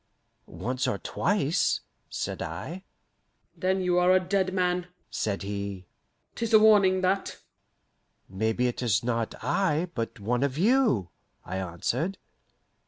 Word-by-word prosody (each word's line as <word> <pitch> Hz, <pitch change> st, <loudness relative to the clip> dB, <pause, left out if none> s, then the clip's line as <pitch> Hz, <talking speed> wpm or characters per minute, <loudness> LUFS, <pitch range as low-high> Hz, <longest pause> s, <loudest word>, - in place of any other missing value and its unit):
"Once 130 Hz, +2 st, -3 dB
or 100 Hz, -, 0 dB
twice," 170 Hz, -, 0 dB, 0.3 s
said -, -, -4 dB
I. 185 Hz, +3 st, -5 dB, 0.7 s
"Then 190 Hz, 0 st, 0 dB
you 180 Hz, -1 st, +2 dB
are 180 Hz, +1 st, +4 dB
a 185 Hz, -, +6 dB
dead 185 Hz, 0 st, 0 dB
man," 180 Hz, -1 st, 0 dB, 0.2 s
said 100 Hz, -2 st, -2 dB
he; 100 Hz, -2 st, -4 dB, 0.5 s
"'tis 230 Hz, -1 st, -3 dB
a -, -, +10 dB
warning, 200 Hz, -4 st, +5 dB
that!" 190 Hz, +1 st, 0 dB, 0.9 s
"Maybe 110 Hz, +5 st, 0 dB
it 125 Hz, 0 st, -1 dB
is 115 Hz, -2 st, +1 dB
not 115 Hz, -2 st, -1 dB
I, 170 Hz, -, +1 dB
but 115 Hz, -3 st, -4 dB
one 120 Hz, +5 st, 0 dB
of 140 Hz, -1 st, 0 dB
you," 205 Hz, -, +3 dB, 0.4 s
I 95 Hz, -, -4 dB
answered. 115 Hz, -, -2 dB
155 Hz, 130 wpm, -27 LUFS, 110-185 Hz, 0.9 s, a